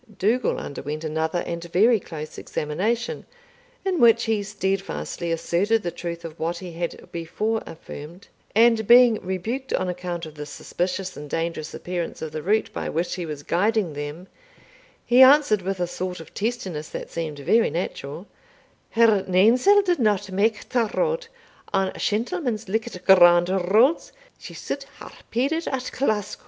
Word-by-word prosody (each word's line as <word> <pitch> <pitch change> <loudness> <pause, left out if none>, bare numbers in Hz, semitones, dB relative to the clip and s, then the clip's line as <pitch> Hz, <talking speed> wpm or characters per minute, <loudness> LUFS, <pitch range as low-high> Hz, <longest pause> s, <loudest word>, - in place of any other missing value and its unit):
Dougal 230 +6 +1
underwent 150 +2 -5
another 160 +2 -1
and 170 0 -4
very 210 +7 +4
close 155 -4 -8
examination, 215 - -2 0.6
in 370 -3 0
which 230 -1 +6
he 220 -2 0
steadfastly 195 -3 -3
asserted 195 +7 +1
the 175 - -2
truth 170 -1 -6
of 165 -1 -9
what 170 +2 -2
he 180 -1 -8
had 170 0 -5
before 210 +7 -2
affirmed; 165 +2 -10 0.3
and 225 -1 +4
being 240 -2 +7
rebuked 220 +9 -3
on 185 - 0
account 180 -1 -4
of 155 - -10
the 150 -1 -8
suspicious 185 +4 -3
and 145 0 -9
dangerous 165 -1 -3
appearance 175 -1 -4
of 160 - -5
the 155 0 -4
route 210 +6 0
by - - -3
which 170 +3 -1
he 175 -2 -4
was 150 -2 -6
guiding 200 0 +1
them, 145 +4 -6 0.8
he 245 +2 +5
answered 265 -6 +6
with 190 +1 -3
a 175 - +1
sort 180 +1 -5
of 165 - -12
testiness 195 -9 -3
that - - -7
seemed 160 -3 -4
very 225 - +3
natural, 165 -1 -5 0.6
"Her 220 -4 +4
nainsell 245 - +5
didna 245 - +2
mak 210 +3 0
ta 235 -3 +1
road; 485 -1 0 0.5
an 195 -1 +1
shentlemans 230 - -1
likit 220 -2 -3
grand 175 -2 +7 0.2
roads, 255 +10 +4 0.3
she - - -10
suld 280 - -4 0.2
hae - - -10 0.2
pided 280 +8 0
at 255 -1 -3
Glasco." 210 -6 -1
190 Hz, 155 wpm, -24 LUFS, 170-230 Hz, 0.8 s, being